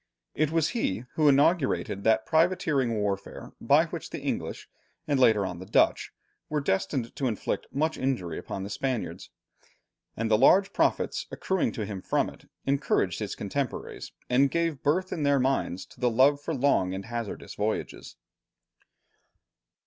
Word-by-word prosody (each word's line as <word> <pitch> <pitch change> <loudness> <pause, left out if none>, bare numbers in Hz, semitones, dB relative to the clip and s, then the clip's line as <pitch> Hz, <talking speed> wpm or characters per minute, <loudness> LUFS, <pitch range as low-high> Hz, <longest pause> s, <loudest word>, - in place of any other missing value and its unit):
It 155 0 +1
was 160 -1 +1
he 120 - -2
who 155 -2 +3
inaugurated 140 - +2
that 110 0 +3
privateering 160 -7 +2
warfare 100 -2 -3
by - - +4
which - - -7
the - - -5
English, - - -4 0.4
and 145 -3 +1
later 110 -6 +4
on 90 -2 -5
the 95 - -8
Dutch, 110 - +2 0.4
were 150 - 0
destined 115 0 -1
to 135 - -1
inflict 110 -5 -2
much 155 +3 -1
injury 120 -11 -2
upon 95 - -6
the 100 - -6
Spaniards. 125 +3 -3 0.9
And 115 0 -1
the 110 - +5
large 195 +9 +5
profits - - 0
accruing 190 -2 -1
to 110 - -3
him 100 -2 -6
from - - 0
it, - - -19 0.2
encouraged 135 - +1
his 105 -3 -4
contemporaries, 125 +6 -4 0.2
and 135 +3 +3
gave 165 -2 -1
birth 185 +6 +1
in 160 - -3
their 140 -1 +3
minds 130 -8 0
to - - -19
the 125 - +2
love 135 +5 +4
for 160 +2 -3
long 110 -9 +2
and 95 +1 -6
hazardous 115 -2 -5
voyages. 105 +1 -3
130 Hz, 155 wpm, -27 LUFS, 105-145 Hz, 0.9 s, the